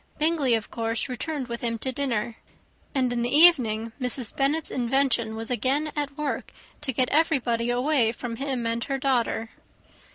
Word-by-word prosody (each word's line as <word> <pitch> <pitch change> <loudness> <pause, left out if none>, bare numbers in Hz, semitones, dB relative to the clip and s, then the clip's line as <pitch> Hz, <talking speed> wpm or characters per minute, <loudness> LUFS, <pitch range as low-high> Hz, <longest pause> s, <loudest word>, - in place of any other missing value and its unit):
Bingley 300 -6 +2
of 220 -1 -4
course 230 +1 -2
returned 265 +2 -4
with 235 -1 -5
him 230 -1 -1
to 260 +4 -2
dinner; 235 -4 -2 0.6
and 255 -2 +1
in 240 - -1
the 240 - 0
evening 245 -8 +5
Mrs. 250 -2 0
Bennet's 285 +3 0
invention 245 -3 +1
was 225 +2 -4
again 275 +5 0
at 285 -1 -3
work 300 -1 -3 0.3
to 290 -3 -2
get 255 0 0
everybody 255 -7 +1
away 245 -1 +2
from 235 -1 -6
him 265 -3 -2
and 230 0 -1
her 275 -1 -2
daughter. 245 -4 0
250 Hz, 165 wpm, -26 LUFS, 230-280 Hz, 0.6 s, evening